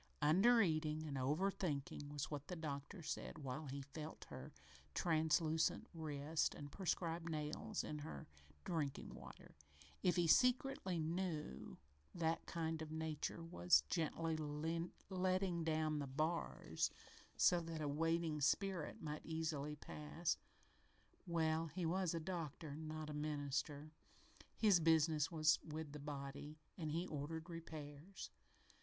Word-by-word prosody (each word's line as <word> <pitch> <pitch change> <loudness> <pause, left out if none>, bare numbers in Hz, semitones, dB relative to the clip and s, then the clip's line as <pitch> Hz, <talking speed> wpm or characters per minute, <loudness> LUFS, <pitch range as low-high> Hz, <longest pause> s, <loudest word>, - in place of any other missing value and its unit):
"Under 220 +10 +7
eating 155 -2 +1
and 145 -3 -3
over 150 +9 +2
thinking" 145 -5 -2
was 145 -1 -3
what 145 -1 -4
the 180 - -3
doctor 155 +3 -4
said - - -3
while 140 +2 -4
he 140 +1 -4
felt 150 +3 -7
her - - -7 0.4
translucent 160 -1 +3
wrist 155 -1 0
and 145 -1 -7
prescribed 170 -1 -1
nails 150 -1 -2
in 150 - -3
her 150 +2 -6 0.4
drinking 150 -5 -2
water. - - -11 0.5
If 180 -2 +4
he 175 -1 +4
secretly 250 - +4
knew 160 - -2 0.4
that 165 -1 0
kind 160 -1 -1
nature 160 +1 -2
was 90 - +5
gently 165 0 +1
letting 170 +4 0
down 155 -1 +1
the 140 - -2
bars 155 +6 0 0.5
so 175 -1 +6
that 165 -1 -4
a 150 - -1
waiting 160 +1 +1
spirit 185 +2 +1
might 150 -1 -3
easily 155 -2 -1
pass 150 +3 -2 0.9
well, 165 -1 +2
he 170 +3 -3
was 180 0 +1
a - - 0
doctor, 160 -3 -4
not 155 0 -4
a - - -4
minister. 150 0 -1 0.7
His 205 -5 +6
business 160 -2 +4
was 155 -1 +5
with 155 -1 -5
the 150 - -6
body, 145 +1 -5 0.2
and 155 -3 -3
he 170 +3 0
ordered 160 +2 -4
repairs. 160 +1 -7
160 Hz, 130 wpm, -41 LUFS, 150-170 Hz, 0.9 s, Under